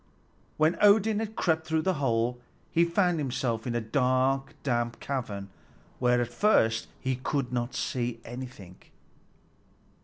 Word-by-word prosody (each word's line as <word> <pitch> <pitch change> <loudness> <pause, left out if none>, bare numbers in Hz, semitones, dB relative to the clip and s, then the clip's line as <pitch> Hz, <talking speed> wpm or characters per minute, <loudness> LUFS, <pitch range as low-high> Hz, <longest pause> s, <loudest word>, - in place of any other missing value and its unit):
When 155 +2 +2
Odin 210 +1 +5
had 220 0 -4
crept 160 -2 0
through 160 0 +1
the 190 - +2
hole, 120 -1 +1 0.3
he 170 +1 +4
found 175 -1 +1
himself 125 -4 -2
in 120 - -2
a 120 - 0
dark, 130 +4 +1
damp 120 -3 -1
cavern, 105 -8 -4 0.5
where 125 -1 +3
at 120 - -2
first 115 - +3
he 130 -1 -1
could 130 0 -2 0.3
see 120 -1 -2
nothing. 120 -7 -9
130 Hz, 130 wpm, -28 LUFS, 120-160 Hz, 0.5 s, Odin